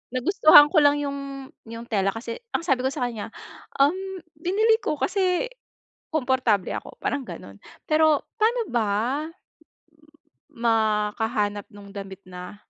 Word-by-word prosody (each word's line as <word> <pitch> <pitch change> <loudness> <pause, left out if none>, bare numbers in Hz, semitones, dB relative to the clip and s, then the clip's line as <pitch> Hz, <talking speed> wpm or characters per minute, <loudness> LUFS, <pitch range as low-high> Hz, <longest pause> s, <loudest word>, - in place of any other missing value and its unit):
nagustuhan 300 +1 +7
ko 335 - +5
lang 290 0 +4
yung 275 -1 -6 0.2
yung 230 +1 -7
tela 195 -2 +2
kasi 230 +1 -6 0.2
ang 335 - -1
sabi 265 -4 +1
ko - - +3
sa 250 - -3
kanya, 225 -2 -6 0.5
um, 280 +2 +6 0.5
"Binili 425 +7 +2
ko 305 - -1
kasi, 380 +5 0 0.6
komportable 255 - +1
ako," - - -7
parang 285 - -1
ganun. 100 - -10 0.3
Pero 310 -1 +3
pa'no 460 +1 +2
ba 225 -4 +1 1.6
makahanap 215 -2 0
nung 200 -1 -13
damit 195 -1 -8
na 180 +2 -9
255 Hz, 130 wpm, -24 LUFS, 210-310 Hz, 1.6 s, nagustuhan